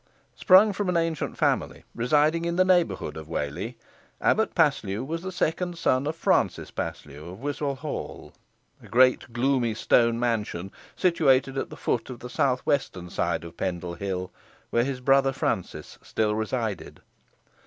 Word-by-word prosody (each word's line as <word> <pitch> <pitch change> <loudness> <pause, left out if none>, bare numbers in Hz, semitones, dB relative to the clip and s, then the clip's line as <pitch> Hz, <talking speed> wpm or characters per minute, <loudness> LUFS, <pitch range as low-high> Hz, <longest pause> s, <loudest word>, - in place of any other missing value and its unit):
Sprung 200 +3 +6
from 200 -1 -2
an 180 - +2
ancient 165 -2 -1
family - - 0
residing 150 +7 +2
in 170 0 -1
the 185 +1 +4
neighbourhood 175 - +1
Of 80 -1 -8
Whalley, 85 - -4 0.4
Abbot 220 - +1
Paslew 130 - +1
was 165 +4 -4
the 190 +1 -5
second 175 0 -1
son 130 -3 +1
of 155 - -2
Francis - - +1
Paslew 75 +3 -6
Of 95 - -10
Wiswall 145 +1 -2
Hall, - - -6 0.5
a - - -14
great 130 0 +3
gloomy 120 -1 +1
stone 115 +1 +3
mansion, 105 -6 -2 0.2
situated 135 -7 +3
at 135 - -3
the - - -10
foot 115 0 -1
of 125 - -6
the 125 +1 -9
south 130 -1 +1
western 90 -11 -2
side - - -1
of 85 -1 -11
Pendle 90 -2 -3
Hill, 90 0 -4 0.4
where 120 - +3
his 130 -1 -3
brother 135 +1 +4
Francis - - -3
still 105 -1 -1
resided. 110 -1 -3
130 Hz, 155 wpm, -26 LUFS, 105-155 Hz, 0.5 s, Sprung